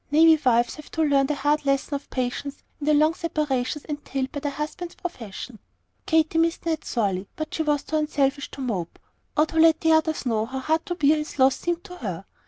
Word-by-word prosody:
Navy 320 +1 +6
wives 240 -2 +3
have 305 - -11
to 320 - +1
learn 280 -2 +3
the 300 - 0
hard 295 +2 +1
lesson 275 +1 0
of 280 0 -4
patience 255 +2 -3 0.2
in 295 - -5
the 305 - +5
long 310 +2 +4
separations 300 -5 -2
entailed 275 -3 -4
by 285 - -4
their 290 0 -2
husbands' 310 +4 -5
profession. 235 - -7 0.5
Katy 320 0 +3
missed 335 +2 +1
Ned 320 -2 -1
sorely, 200 -5 -1
but 310 0 -5
she - - -1
was 295 -2 +1
too 315 - -1
unselfish 285 -2 0
to 275 - -8
mope, 195 -10 -3 0.4
or 305 - +5
to 320 +1 -2
let 320 -1 +6
the 320 - +3
others 315 -2 +2
know 225 -2 0
how 265 +2 -5
hard 315 +5 0
to 350 - -2
bear 305 -1 +4
his 300 0 -5
loss 265 0 +5
seemed 345 0 -2
to 360 - -10
her. 195 - -5
295 Hz, 215 wpm, -25 LUFS, 265-315 Hz, 0.5 s, Navy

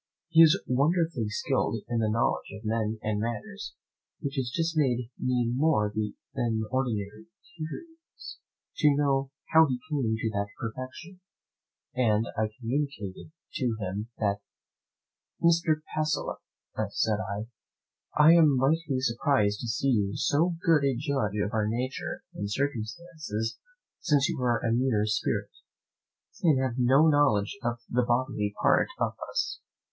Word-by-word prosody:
He 165 -1 +6
is 165 +4 +7
wonderfully 145 -3 +1
skilful 130 -4 -1
in 120 -1 -1
the 110 -1 +1
knowledge 115 +2 0
of 105 +2 -10
men 110 0 -1
and 105 -1 -1
manners, 105 - -5 0.4
which 140 - -4
has 150 +6 -1
made 125 -5 +1
me 125 -2 +1
more 115 -8 +2
than 110 +2 -2
ordinarily 115 0 -2 0.3
curious 325 - -9 0.4
to 150 -2 +4
know 140 -2 +1 0.2
how 160 0 +7
he 130 -2 -2
came 125 -7 +1
to 110 0 -1
that 100 -1 -1
perfection, 130 +10 -7 0.7
and 115 -3 +2
I 110 0 0
communicated 120 -5 -3 0.2
to 125 -4 -1
him 100 +2 -3
that 100 -2 0 1.0
doubt. 170 - +5
"Mr. 160 -2 +1
Pacolet," 155 0 -1 0.5
said 110 -1 +1
I, 105 0 -4 0.7
"I 150 +2 +8
am 155 -5 +5
mightily 140 0 +1
surprised 115 -4 +1
to 120 - -5
see 125 +4 0
you 100 -5 +1
so 165 +4 +2
good 160 -4 +4
a 135 -2 +2
judge 130 -6 -1
of 105 - -3
our 110 -1 +1
nature 125 +4 -3
and 100 - -4
circumstances, 140 -1 -3 0.4
since 145 -2 +2
you - - -3
are 120 -1 +1
a 115 - +2
mere 120 -4 +2
spirit, 105 0 -1 0.9
and 155 -6 +4
have 130 -1 -1
no 135 +6 +5
knowledge 145 - +3
of 120 -1 -2
the 125 - +1
bodily 120 -3 0
part - - +4
of - - 0 0.2
us." - - -2
125 Hz, 140 wpm, -28 LUFS, 110-145 Hz, 1.0 s, I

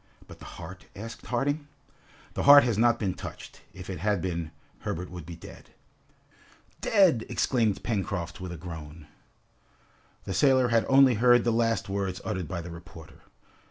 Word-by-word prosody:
"But - - -13
the - - -12
heart?" 90 +3 -10
asked 115 +3 -9
Harding. 145 +4 -1 0.7
"The - - -2
heart 145 0 +10
has 120 -3 0
not 120 +2 +3
been 100 -5 -1
touched; - - -10
if 90 -1 -10
it 95 -4 -5
had 105 +2 +1
been, 85 -2 -3 0.3
Herbert 90 +2 -5
would 90 -3 -9
be 85 - -7
dead!" 85 - -13 1.1
"Dead!" 185 - +4
exclaimed 115 -6 0
Pencroft, 95 -5 -3
with 90 -1 -6
a 85 - -6
groan. 80 -2 -9 1.2
The 95 - -4
sailor 130 -2 +4
had 115 -1 +2
only 135 -1 +6
heard 120 +2 +5
the 120 - +1
last 115 -2 +1
words 95 -2 -2
uttered 90 -3 -3
by 85 +1 -4
the 85 +1 -8
reporter. 85 -1 -12
100 Hz, 160 wpm, -27 LUFS, 85-120 Hz, 1.2 s, heart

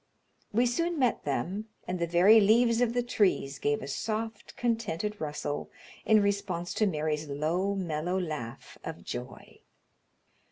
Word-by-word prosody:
We 235 +4 +3
soon 335 +8 0
met 250 -4 +1
them, 175 - -2 0.2
and 180 0 -2
the 170 - 0
very 185 +6 +7
leaves 230 +3 +4
of 240 -1 +2
the 245 - +2
trees 185 - +1
gave 145 -1 0
a - - -5
soft, 220 +8 -4
contented 215 -4 -1
rustle 145 -1 -3 0.4
in 215 -2 +5
response 200 -4 -1
to 215 - +2
Mary's 155 -3 -1
low, 170 +8 0
mellow 175 0 -1
laugh 150 -10 -6
of - - -7
joy. - - -7
190 Hz, 145 wpm, -29 LUFS, 155-220 Hz, 0.4 s, very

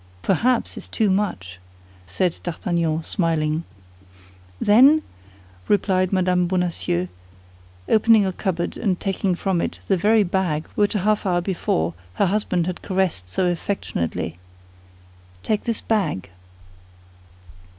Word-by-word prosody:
"Perhaps 235 +6 +1
is - - -7
too 215 -3 +1
much," 90 - -2 0.5
said 170 - -1
D'Artagnan, 165 -2 -1
smiling. 160 -3 0 0.9
"Then," 270 +9 +6 0.6
replied 185 -2 +2
Mme. 180 -2 +2
Bonacieux, 170 - -1 0.8
opening 220 -1 +5
a 190 - -1
cupboard 175 -3 -2
and 190 -5 0
taking 195 -1 -1
from 185 -1 0
it - - -3
the 195 - +2
very 215 +4 +4
bag 175 -5 -1
which 205 +1 +1
a - - +2
half 215 -1 +1
hour 175 -1 +2
before 170 - -1 0.2
her - - +2
husband 185 -3 0
had 180 0 -4
caressed 185 - -1
so 140 - 0
affectionately, 90 - -2 1.0
"take 215 -1 -1
this 230 -2 -2
bag." 145 - -1
185 Hz, 120 wpm, -22 LUFS, 165-205 Hz, 1.0 s, Then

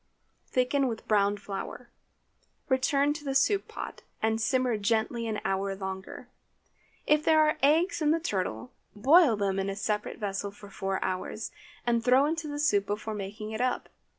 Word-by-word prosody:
Thicken 260 +2 +1
with 225 -2 -5
browned 205 -1 +2
flour; 205 +5 -7 0.8
return 275 +2 +2
to 300 0 -8
the 270 -2 -2
soup 390 +9 +3
pot, - - -7 0.2
and 220 0 0
simmer 255 0 +2
gently 225 +2 0
an 215 -1 -2
hour 195 0 0
longer. 190 +5 -6 0.8
If 300 0 +3
there 315 -1 +5
are 305 - 0
eggs 320 +6 +3
in 300 - +3
the 325 +2 +3
turtle, 185 - -3 0.2
boil 275 - +6
them 195 -2 0
in 195 0 -1
a 195 - -3
separate 210 0 -2
vessel 200 -1 -3
for 205 0 -13
four 195 -1 -2
hours, 185 +4 -3 0.3
and 235 -1 +1
throw 255 +3 +5
into 320 +1 -2
the 290 0 -4
soup 205 -9 +2
before 210 +1 -3
taking 210 +2 -6
it 220 +2 -3
up. 255 0 -1
220 Hz, 170 wpm, -29 LUFS, 200-275 Hz, 0.8 s, boil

